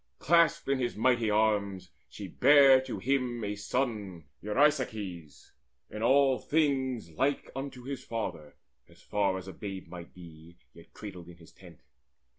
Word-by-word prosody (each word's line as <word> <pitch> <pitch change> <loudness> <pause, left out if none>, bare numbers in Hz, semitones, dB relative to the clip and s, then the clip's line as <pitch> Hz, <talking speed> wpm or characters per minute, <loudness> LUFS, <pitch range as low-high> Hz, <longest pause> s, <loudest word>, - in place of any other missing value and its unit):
Clasped 170 0 +3
in 135 -1 +1
his 120 -2 -2
mighty 120 0 +2
arms, 100 -3 0 0.2
she - - -8
bare 140 -2 +6
to 130 -2 -6
him 125 -3 -1
A 105 0 -3
son 105 -6 -3 0.2
Eurysaces, 105 - -1 0.4
in 110 - -6
all 135 +2 +4
things 130 - 0
like 135 - -1
Unto 135 -2 -6
his 135 +1 -6
father, 90 -10 -5 0.4
far 100 -2 -1
as 95 0 -9
babe 95 -2 -7
might 85 0 -10
be 85 -1 -14 0.2
Yet 85 - -17
cradled 95 -5 -9
in 85 - -13
his 85 -1 -17
tent. - - -16
110 Hz, 140 wpm, -29 LUFS, 95-135 Hz, 0.4 s, bare